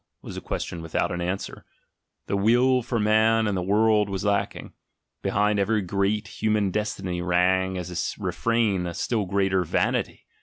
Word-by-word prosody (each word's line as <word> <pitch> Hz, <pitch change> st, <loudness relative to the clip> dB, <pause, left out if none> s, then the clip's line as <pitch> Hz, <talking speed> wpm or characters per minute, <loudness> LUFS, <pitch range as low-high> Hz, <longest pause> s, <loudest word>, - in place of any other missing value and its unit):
was -, -, -8 dB
a -, -, -5 dB
question 85 Hz, -, -4 dB
without 80 Hz, -1 st, -1 dB
an 90 Hz, -, -3 dB
answer; 90 Hz, +3 st, -4 dB, 0.6 s
the -, -, -2 dB
will 120 Hz, +5 st, +3 dB
for 120 Hz, -1 st, -2 dB
man 110 Hz, +1 st, +3 dB
and 105 Hz, -2 st, 0 dB
the 90 Hz, -, -1 dB
world 105 Hz, +2 st, +3 dB
was 95 Hz, +1 st, -3 dB
lacking; 100 Hz, 0 st, -1 dB, 0.5 s
behind 105 Hz, 0 st, +1 dB
every 105 Hz, +1 st, +1 dB
great 100 Hz, +3 st, 0 dB
human 110 Hz, -5 st, 0 dB
destiny 95 Hz, -4 st, -3 dB
rang 95 Hz, +1 st, +2 dB
as 90 Hz, -1 st, -3 dB
a -, -, -11 dB
re -, -, 0 dB
frain 110 Hz, -6 st, 0 dB
a 85 Hz, -, -5 dB
still 110 Hz, -5 st, -1 dB
greater 95 Hz, -1 st, +1 dB
"Vanity!" 80 Hz, -, -1 dB
100 Hz, 165 wpm, -25 LUFS, 95-110 Hz, 0.6 s, will